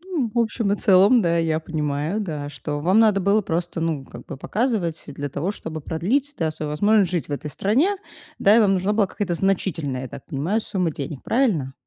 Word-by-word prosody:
Ну, 340 -10 -2
в 240 - -1
общем 220 -2 +1
и 205 - +1
целом, 200 +6 +5
да, 170 -1 +2
я 160 -1 +1
понимаю, 155 +4 -2
да, 150 -7 -4
что 145 +1 -5
вам 185 +7 +3
надо 210 -3 +4
было 200 +3 +3
просто 170 -1 -3
ну 160 -5 -1
как 120 -1 -12
бы - - -7
показывать 205 - -1
для 145 0 -5
того, 170 +8 -2
чтобы 160 -6 -6
продлить, 250 - -1
да, 160 -2 0
свою 155 -1 -5
возможность 205 +3 +3
жить 175 -4 -2
в - - -5
этой 150 +1 -4
стране. 275 - +1 0.4
Да, 205 +3 +5
и - - +6
вам 205 -3 +4
нужна 190 +3 0
была 210 -2 +2
какая-то 185 -2 -3
значительная, 165 -8 -1
я 130 - -6
так 130 - -10
понимаю, 170 +9 -1
сумма 185 -6 -1
денег. 140 -2 -6
Правильно? 200 - +1
175 Hz, 210 wpm, -23 LUFS, 150-210 Hz, 0.4 s, и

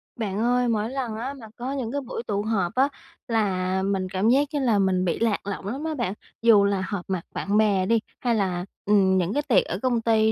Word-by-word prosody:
Bạn 205 -4 -3
ơi, 245 +2 +2
mỗi 220 -1 0
lần 255 -4 -3
á 250 +5 -4
mà 245 -6 -11
có 250 +2 -4
những 260 -5 -3
cái 285 +1 -2
buổi 235 -2 -6
tụ 205 -1 0
họp 205 -5 -1
á 265 +2 +4 0.4
là 190 -4 0
mình 190 -1 -1
cảm 195 +4 +1
giác 275 +4 +4
như 295 - 0
là 235 -6 +2
mình 185 -1 +2
bị 170 - -1
lạc 220 -3 0
lõng 195 -1 -4
lắm 265 +8 -4
á 320 0 -2
bạn, 235 -7 -1 0.3
dù 225 -3 +6
là 200 -2 0
họp 200 -4 -4
mặt 185 -3 -1
bạn 200 +1 0
bè 205 -4 +3
đi 230 +3 +3 0.2
hay 240 -2 +1
là, 185 -4 -1 0.2
ừm, 195 -2 +4
những 180 +2 0
cái 290 - 0
tiệc 225 -8 +4
ở 180 - -4
công 245 -3 +1
ty 220 -1 +3
215 Hz, 245 wpm, -25 LUFS, 190-240 Hz, 0.4 s, dù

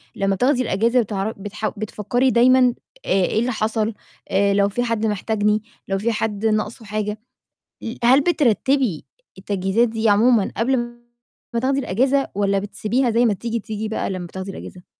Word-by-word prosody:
لمّا 195 0 0
بتاخدي 255 +5 +2
الإجازة 230 +4 +2
بتعر 205 -1 -2
بتح 205 +2 -4
بتفكّري 245 +5 0
دايمًا، 250 0 +5 0.3
آآ، - - -7 0.2
إيه 215 - 0
اللي 245 +2 0
حصل، 220 0 -1 0.4
آآ، 200 +1 +2
لو 200 0 +3
فيه 245 +4 -1
حد 230 -2 -1
محتاجني، 210 0 0 0.2
لو 195 - 0
فيه 230 +4 0
حد 215 -1 -2
ناقصه 215 +1 -1
حاجة، 210 0 -3 0.6
ل 230 - -5
هل 260 +4 +6
بترتبي 270 - +1 0.3
التجهيزات 195 +4 0
دي 220 0 0
عمومًا 215 +1 +4
قبل 255 +4 +2
م 240 0 -5 0.5
ما 235 - +1
تاخدي 270 +3 +1
الإجازة، 270 +4 +1
والّا 200 -1 +1
بتسيبيها 215 +5 -1
زي 235 +2 +3
ما 220 - +3
تيجي 230 +3 -3
تيجي 215 0 -5
بقى 220 - -2
لمّا 185 -2 -4
بتاخدي 190 +2 -6
الإجازة؟ 180 -1 -10
220 Hz, 170 wpm, -21 LUFS, 205-240 Hz, 0.6 s, هل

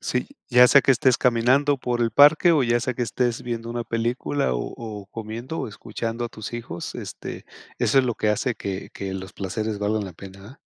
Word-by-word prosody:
Sí, - - -2 0.2
ya 125 0 +7
sea 140 - +7
que - - +3
estés 125 0 +3
caminando 130 +4 +3
por 120 -1 -2
el 115 - +1
parque, 150 +6 +6
o 150 -5 +3
ya 120 0 +2
sea 130 +2 -1
que 125 - -2
estés 120 0 -1
viendo 115 -1 -4
una 120 0 -2
película, 120 - -1
o - - -3
o 105 -4 -7
comiendo, 115 +8 -6
o - - -3
escuchando 115 +3 -5
a - - -3
tus 110 -1 -8
hijos, 115 -8 -6
este, - - -7 0.3
eso 135 - +3
es 130 - +4
lo 120 - -1
que 105 - -1
hace 120 +4 0
que 95 -1 -5
que 95 -1 -5
los 95 0 -7
placeres 110 +2 -3
valgan 105 0 0
la 95 - -8
pena, 95 +3 -12
¿verdad? 110 +8 -13
115 Hz, 220 wpm, -24 LUFS, 105-125 Hz, 0.3 s, ya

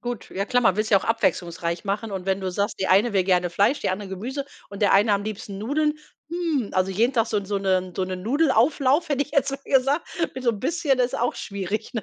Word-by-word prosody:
Gut, 240 -2 -6
ja 195 +1 -2
klar, 245 0 +2
man 195 - +3
will's 215 0 0
ja 200 - +6
auch - - -9
abwechslungsreich 175 -5 -1
machen. 205 +2 -2
Und 185 -1 -4
wenn 190 0 0
du 190 - -2
sagst: 200 +3 -2
„Die 190 - +1
eine 205 +4 +4
will 190 -2 +2
gerne 180 -2 +2
Fleisch, 205 +10 +2
die - - 0
andere 195 +1 -4
Gemüse 250 +9 -4 0.3
und 200 - -9
der 200 - +4
eine 205 +2 +4
am 200 - +1
liebsten 200 -2 -6
Nudeln", 300 +7 0 0.4
hm, 330 - -1
also 185 +1 +1
jeden 230 +7 +2
Tag 230 -2 +2
so 220 - -2
'n 200 - -1
so 200 -1 -1
'ne 185 -2 0
so 185 - 0
'nen 185 -1 -5
Nudelauflauf, 280 - +2
hätte 285 0 +2
ich 290 - -10
jetzt 275 -1 +2
mal 275 - -4
gesagt, 275 +4 +2 0.3
mit 260 - -6
so 235 - +3
bisschen 280 - 0
ist 250 +2 +1
auch 240 +1 0
schwierig, 200 +2 -4
ne? 220 - -2
215 Hz, 250 wpm, -24 LUFS, 195-260 Hz, 0.4 s, ja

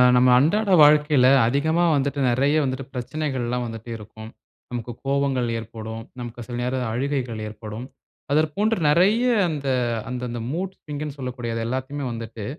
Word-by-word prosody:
நம்ம 125 +1 +5
அன்றாட 195 +8 +2
வாழ்க்கையில 150 -3 +5 0.2
அதிகமா 160 +6 +1
வந்துட்டு, 140 +1 -1
நெறைய 140 +5 +2
வந்துட்டு 130 0 -3
பிரச்சனைகள்லாம் 125 -2 -2
வந்துட்டே 115 +1 -8
இருக்கும். 110 +1 -11 0.4
நமக்கு 120 -1 -4
கோவங்கள் 135 -2 +1
ஏற்படும். 110 0 -7 0.2
நமக்கு 120 0 -7
சில 120 - -5
நேரம் 125 +1 -1
அழுகைகள் 125 -3 -2
ஏற்படும். 110 +2 -7 0.5
அதற்போன்று 160 +9 +2
நெறைய 190 +10 +4 0.2
அந்த 150 -4 -4 0.4
அந்தந்த 125 -1 -4
மூட்ஸ்விங்குன்னு 150 -4 -5
சொல்லக்கூடிய 125 -3 -4
அது 115 - -2
எல்லாத்தையுமே 130 +3 -3
வந்துட்டு, 115 -2 -6
130 Hz, 130 wpm, -23 LUFS, 120-150 Hz, 0.5 s, நம்ம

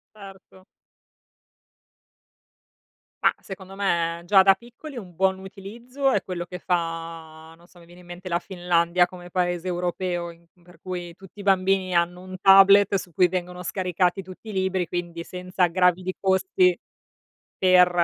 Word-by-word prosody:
Certo. 190 -2 -14 2.6
Ma - - +4
secondo 190 -1 -10
me 170 -4 -1
già 195 0 +6
da 195 0 +7
piccoli 240 +7 -12
un 190 -7 -8
buon 190 +1 +1
utilizzo 235 +8 -4
è 200 - +1
quello 180 -2 -5
che 180 +1 -9
fa, 165 -2 -4
non 170 - -21
so, 175 0 -20
mi 170 - -16
viene 175 +1 -16
in 175 - -19
mente 175 +1 -9
la 170 - 0
Finlandia 175 -1 +1
come 175 -1 -11
paese 175 -1 -1
europeo 175 -1 -2
in 170 0 -18 0.2
per 175 -1 -19
cui 180 -2 -6
tutti 195 +2 -15
i - - -6
bambini 190 -1 +2
hanno 175 +1 0
un 185 0 -9
tablet 195 +1 +7
su 180 -3 -3
cui 180 +3 +4
vengono 180 0 -5
scaricati 180 0 0
tutti 185 +4 -11
i - - -6
libri, 190 -2 -1
quindi 170 0 -5
senza 180 0 -1
sgravi 180 +1 +2
di 185 0 -4
costi 365 - +2 0.8
per 180 -1 +5
180 Hz, 155 wpm, -24 LUFS, 175-190 Hz, 2.6 s, da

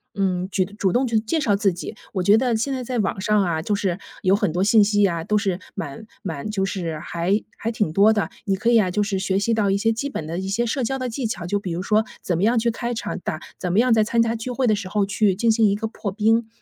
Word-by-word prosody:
嗯， 185 -2 0
去 190 - +2
主 200 -2 -1
动 255 +2 +2
去 230 -2 +2
介 225 +9 -1
绍 210 -8 +2
自 200 -2 +2
己。 180 +5 -7 0.2
我 185 -3 -1
觉 205 +4 +6
得 245 -1 +1
现 230 +5 -1
在 260 - -3
在 245 0 -2
网 195 -2 -1
上 210 +1 +2
啊， 165 -3 -1
就 205 +5 0
是 195 -4 -1 0.2
有 190 0 +3
很 205 -4 0
多 180 - +1
信 215 +2 +5
息 205 0 +3
啊， 170 -4 -1
都 210 - +2
是 195 -3 -1 0.2
蛮 145 +6 -6 0.2
蛮 165 +1 -5
就 200 -2 -1
是 170 -5 -3
还 175 +6 -1 0.2
还 225 - -3
挺 215 -8 -1
多 200 +6 +5
的。 210 -2 -1 0.2
你 195 - +1
可 230 +5 0
以 235 -1 +6
啊， 185 - 0
就 210 - 0
是 200 -1 -1
学 190 0 0
习 230 +3 +1
到 210 -2 +1
一 195 - +2
些 225 +3 +2
基 230 +5 -2
本 160 - -5
的 165 +2 -4
一 190 - -4
些 230 +5 0
社 250 +3 -1
交 270 +3 -1
的 255 -1 -2
技 240 +2 -3
巧， 185 -5 -4
就 205 +3 0
比 185 -3 -5
如 175 - -3
说， 215 +2 +2 0.2
怎 175 -3 -1
么 185 - 0
样 235 +3 +3
去 235 - +1
开 240 +1 -3
场 225 - -4
打 180 -4 -4 0.2
怎 180 - -2
么 200 - +4
样 245 0 +4
在 220 - +4
参 230 +1 +2
加 230 0 +1
聚 225 +2 -5
会 255 +1 0
的 215 - +4
时 200 -2 -5
候 205 +1 +1
去 200 -1 +1
进 230 +4 +2
行 220 0 +3
一 200 - +1
个 220 +2 -3
破 215 -2 -5
冰。 220 +3 +2
205 Hz, 315 characters per minute, -22 LUFS, 190-225 Hz, 0.2 s, 觉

